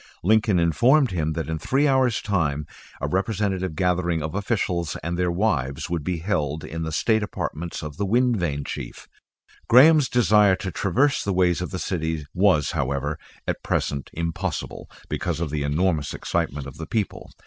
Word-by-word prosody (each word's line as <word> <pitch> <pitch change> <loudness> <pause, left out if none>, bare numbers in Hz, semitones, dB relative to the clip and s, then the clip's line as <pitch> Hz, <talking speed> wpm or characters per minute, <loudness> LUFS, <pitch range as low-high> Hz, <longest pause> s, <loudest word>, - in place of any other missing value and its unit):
Lincoln 110 0 +3
informed 120 - +4
him 80 -3 -1
that 80 0 -3
in 80 0 -3
three 135 - +2
hours' 130 -4 +2
time 75 -8 0 0.3
a 70 - -2
representative 95 -1 -1
gathering 85 -3 0
of 80 +1 -4
officials 95 -5 -1
and 85 +1 -2
their 90 0 0
wives 80 -6 -1
would 85 -3 -1
be 90 +2 -2
held 80 -4 -2
in 80 +1 -5
the 80 0 -3
state 110 +8 +2
apartments 85 -5 -4
of 75 -1 -7
the 100 - -1
wind 120 +2 +3
vane 75 -6 -2
Chief. - - -7 0.6
Graham's 145 +3 +7
desire 105 -5 +4
to 95 -1 -5
traverse 125 - +1
the 100 - -1
ways 90 -1 +2
of 90 - -3
the 95 - -4
city 80 -4 -2
was, 90 -6 +3
however, 70 +3 -2 0.3
at - - -2
present 70 -1 -2
impossible, 85 0 -4 0.2
because 85 -3 -2
of 85 -4 -2
the 75 -1 -2
enormous 75 +1 0
excitement 70 0 -2
of 70 - -9
the 80 - -6
people. 110 -4 -3
90 Hz, 170 wpm, -24 LUFS, 80-105 Hz, 0.6 s, Graham's